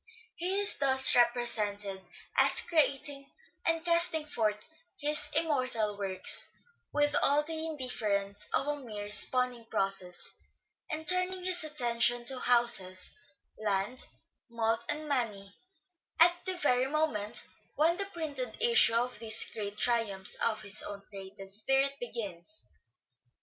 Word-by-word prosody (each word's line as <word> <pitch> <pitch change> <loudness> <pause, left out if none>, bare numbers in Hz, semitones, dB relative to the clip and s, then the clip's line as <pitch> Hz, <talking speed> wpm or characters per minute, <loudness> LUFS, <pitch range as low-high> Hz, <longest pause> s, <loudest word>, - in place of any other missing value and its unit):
He 370 +3 0
is 405 - +2
thus 265 -1 +5
represented 210 -5 0 0.3
as - - +5
creating 285 -3 0 0.3
and 330 0 -1
casting 335 -2 +3
forth 215 -7 -2 0.3
his 300 0 0
im 325 +2 +2
mortal 255 -8 -1
works 190 -2 0 0.4
with 290 0 +1
all 290 +1 +3
the 320 +1 -3
indifference 210 -8 -2
of - - 0
a 295 0 -1
mere 210 -6 -7
spawning 250 +2 +1
process, 195 -2 -1 0.5
and 315 0 -3
turning 365 0 +1
his 360 -2 +2
attention 240 -5 +1
to 255 +1 -1
houses, 235 -8 +2 0.5
land, 205 +4 -1 0.4
malt 225 -1 -1
and 300 +1 -1
money 210 -8 -3 0.6
at 345 +1 +7
the 375 -1 -2
very 255 -5 +1
moment 255 -8 -1 0.3
when 325 +4 +2
the 395 - -2
printed 290 - -6
issue 465 - +5
of 245 -1 -1
these 220 0 +4
great 205 -1 -6
triumphs 210 -5 +1
of 215 -1 -1
his 200 +1 +4
own 200 -1 -6
creative 195 0 -6
spirit 270 +7 +3
begins. 230 - -6
245 Hz, 130 wpm, -30 LUFS, 210-300 Hz, 0.6 s, at